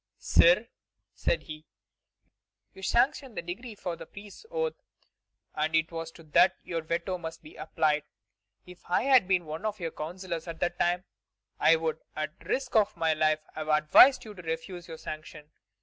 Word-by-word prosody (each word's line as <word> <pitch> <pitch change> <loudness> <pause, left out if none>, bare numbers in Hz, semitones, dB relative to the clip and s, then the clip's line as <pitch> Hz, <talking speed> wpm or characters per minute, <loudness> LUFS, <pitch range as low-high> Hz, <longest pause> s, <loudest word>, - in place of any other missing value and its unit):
"Sire," - - +5 0.5
said - - 0
he, 155 -1 -9 1.1
"you 190 - -13
sanctioned 245 +3 +1
the - - -3
decree 210 +7 -7
for 180 -3 -4
the - - -11
priests' 205 - -12
oath, 480 -1 -1 0.8
and 155 +1 0
it 160 +1 +2
is 165 0 -5
to 165 - -14
that 175 +5 +4
your 165 -2 -3
veto 170 +3 -2
must 165 0 -7
be 155 - -13
applied. 150 -1 0 0.6
If 180 0 -13
I 180 - +2
had 260 -7 +5
been 180 -3 +2
one 155 +4 -6
of 215 -1 -2
your 165 -2 -3
counsellors 170 +1 -5
at 165 -1 -6
the 175 - +1
time, 175 +1 0 0.6
I 165 - +6
would, 160 -1 -2 0.2
at 155 +2 -4
the - - -18
risk 260 -2 -2
of 210 -4 +3
my 165 -1 +2
life, 155 0 +2
have 155 0 -5
advised 155 - +6
you 215 - -9
to 185 - -10
refuse 165 +2 -5
your 165 -1 -8
sanction. 155 -1 -9
170 Hz, 180 wpm, -29 LUFS, 160-195 Hz, 1.1 s, I